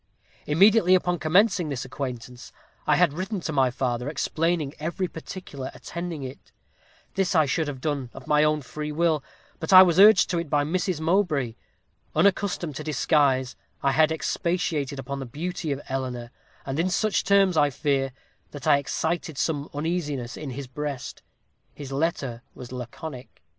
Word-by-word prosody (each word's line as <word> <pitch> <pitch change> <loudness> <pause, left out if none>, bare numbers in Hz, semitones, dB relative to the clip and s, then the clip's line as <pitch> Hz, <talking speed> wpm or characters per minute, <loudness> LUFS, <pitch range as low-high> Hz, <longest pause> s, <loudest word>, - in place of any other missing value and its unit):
"Immediately 185 +4 +5
upon 180 -1 0
commencing 180 0 +3
this 135 -3 -3
acquaintance, 125 -2 -6 0.4
I - - +5
had 175 -5 +3
written 190 +5 -3
to 160 - -3
my 135 -2 +3
father, 125 +1 -2
explaining 160 -1 -1
every 170 +4 -2
particular 160 -6 -7
attending 165 +4 -6
it. 130 +1 -9 0.6
This 190 -1 0
I 155 -2 +5
should 155 +3 0
have 140 -3 -5
done 140 -3 -2
of 135 - -11
my 150 0 +3
own 150 -1 +1
free 150 +3 -5
will, 155 -2 +1 0.4
but - - -3
I 185 0 +11
was 175 -1 +2
urged 205 -2 +8
to 175 - +1
it 170 -3 -5
by 145 -1 +2
Mrs. 180 +2 -1
Mowbray. 160 - +1 0.6
Unaccustomed 185 -6 +1
to 155 - -5
disguise, 140 -4 +2 0.3
I 140 - +3
had 155 +3 +4
expatiated 160 -3 -1
upon 140 +1 -5
the 135 - -5
beauty 165 +4 -4
of 140 0 -3
Eleanor, 125 -3 -4 0.3
and 135 +3 -3
in 175 +3 +2
such 215 +3 +1
terms, 195 -2 +4
I 145 -2 +4
fear, 135 -1 0 0.4
that 145 -3 -9
I 145 -2 +5
excited 160 +1 -2
some 145 -1 -1
uneasiness 145 -5 -3
in 150 - -6
his 135 +2 -6
breast. 140 0 -5 0.5
His 140 -2 -8
letter 135 -5 -1
was 125 -1 -10
laconic. 125 - -8
150 Hz, 165 wpm, -25 LUFS, 135-175 Hz, 0.6 s, I